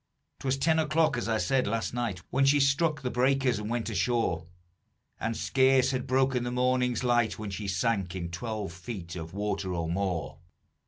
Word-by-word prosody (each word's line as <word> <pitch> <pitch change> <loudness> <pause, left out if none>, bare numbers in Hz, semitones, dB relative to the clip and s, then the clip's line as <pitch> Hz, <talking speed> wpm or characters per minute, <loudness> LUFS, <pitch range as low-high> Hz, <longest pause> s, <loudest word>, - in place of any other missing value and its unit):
'Twas 135 0 0
ten 160 +3 +2
o'clock, 155 -2 +2
as 120 -1 -2
I 110 - +2
said, 130 +3 +1
last 115 +2 -1
night, 115 -7 -3
When 135 - +2
she 140 +2 +5
struck 150 +2 +2
the 125 - -1
breakers 130 -1 +2
and 105 0 -5
went 120 -1 -2
ashore; 110 -7 0 0.7
And 115 0 -2
scarce 130 -1 +3
had 130 0 -2
broken 130 -1 +2
the 120 - -2
morning's 125 -1 +1
light 120 -3 +2
When 105 -2 -5
she 100 +1 -4
sank 95 -1 0
in 85 -2 -4
twelve 105 0 -4
feet 90 -1 -7
of 80 -1 -6
water 100 -2 -2
or 85 -1 -2
more. 90 -2 -2
120 Hz, 180 wpm, -29 LUFS, 100-130 Hz, 0.7 s, she